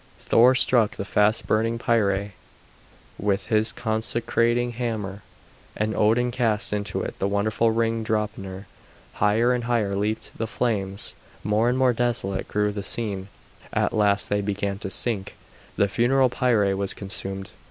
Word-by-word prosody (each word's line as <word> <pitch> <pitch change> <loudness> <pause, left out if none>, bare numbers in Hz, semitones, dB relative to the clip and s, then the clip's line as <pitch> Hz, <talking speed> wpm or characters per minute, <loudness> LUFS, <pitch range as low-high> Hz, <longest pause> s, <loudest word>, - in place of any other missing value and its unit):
Thor 125 +3 +4
struck 120 -4 +4
the 100 - -4
fast 105 +2 +2
burning 115 +2 +1
pyre 100 -4 +1 0.9
with 95 -2 -1
his 110 0 +2
consecrating 120 +1 0
hammer, 110 -4 -4 0.6
and 110 +1 -1
Odin 115 +3 +2
cast 115 -4 0
into 100 -2 -2
it - - -6
the 100 - +1
wonderful 105 +3 +1
ring 115 0 0
Draupner. 105 -3 -3 0.5
Higher 110 +4 +2
and 120 -1 -2
higher 115 -5 0
leaped 105 +2 -2
the 115 - -3
flames, 100 -4 -2 0.3
more 110 +3 +2
and 125 - 0
more 130 -1 +4
desolate 115 -5 -1
grew 105 0 0
the 100 0 -4
scene; 100 -2 -2 0.4
at - - 0
last 105 -1 +2
they 105 0 0
began 100 0 -2
to 95 - -4
sink, 100 0 -2 0.4
the 100 - +3
funeral 125 +5 +3
pyre 115 -6 +2
was 100 0 -2
consumed. 95 0 -6
110 Hz, 145 wpm, -24 LUFS, 100-115 Hz, 0.9 s, Thor